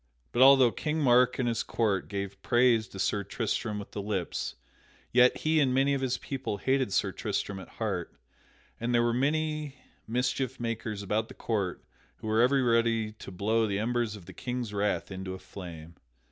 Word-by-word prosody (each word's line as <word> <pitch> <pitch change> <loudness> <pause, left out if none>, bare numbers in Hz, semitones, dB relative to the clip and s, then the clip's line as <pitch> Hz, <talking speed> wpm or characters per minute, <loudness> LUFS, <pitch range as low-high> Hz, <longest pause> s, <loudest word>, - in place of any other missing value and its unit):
But 120 - +1
although 135 -2 +8
King 155 +5 -2
Mark 125 -3 +4
and 125 - 0
his 115 -1 0
court 105 -5 0
gave 100 0 -5
praise 120 -2 +3
to - - -11
Sir 100 +1 0
Tristram 110 +1 -2
with 100 - -7
the 105 - -4
lips, 100 -4 -3 0.6
yet 125 +1 +5
he 155 0 +3
and 130 -3 +3
many 135 +1 +3
of 135 - -1
his 130 -1 0
people 135 -6 -4
hated 130 +1 +1
Sir - - +1
Tristram 100 -2 -3
at 95 - -10
heart, - - -2 0.7
and 120 +1 0
there 120 - +4
were 120 0 +2
many 150 +2 0 0.3
mischief 125 +2 -1
makers 115 -3 -3
about 110 +3 0
the - - -12
court 100 -6 -2 0.3
who - - -12
were 110 +1 +2
ever 130 +2 +4
ready 115 -2 +2
to 105 -2 -11
blow 110 +4 +1
the 100 -1 -1
embers 115 0 0
of 100 -5 -12
the - - -11
King's 125 -4 -4
wrath 100 0 -1
into 95 0 -5
a - - -7
flame. 85 -4 -10
115 Hz, 190 wpm, -29 LUFS, 100-125 Hz, 0.7 s, although